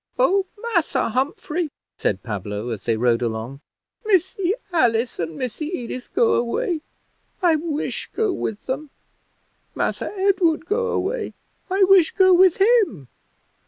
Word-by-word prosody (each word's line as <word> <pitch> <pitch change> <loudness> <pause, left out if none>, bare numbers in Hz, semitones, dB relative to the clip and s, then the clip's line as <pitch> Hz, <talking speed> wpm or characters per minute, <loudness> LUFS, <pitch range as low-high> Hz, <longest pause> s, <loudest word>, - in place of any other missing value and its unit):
"Oh, 395 -6 +3
Massa 415 - 0
Humphrey," 300 +6 -1 0.3
said 100 -1 -1
Pablo, 105 +1 -4
as 110 -4 -4
they 115 -2 +1
rode 120 0 +2
along, 120 +4 -4 0.4
"Missy 380 -1 +1 0.2
Alice 235 -6 +2
and 165 -2 -3
Missy 255 +5 -4
Edith 255 -6 -5
go 465 -1 +4
away 330 - 0 0.6
I 340 -3 +5
wish 310 -1 -3
go 435 -4 +1
with 215 -2 -4
them. 275 +3 -4 0.9
Massa - - -2
Edward 370 -5 +2
go 470 +6 0
away 470 -1 -2 0.3
I 385 +1 +3
wish 375 -3 +5
go 375 -2 +6
with 360 -1 +5
him. 385 - +3
320 Hz, 130 wpm, -22 LUFS, -, 0.9 s, go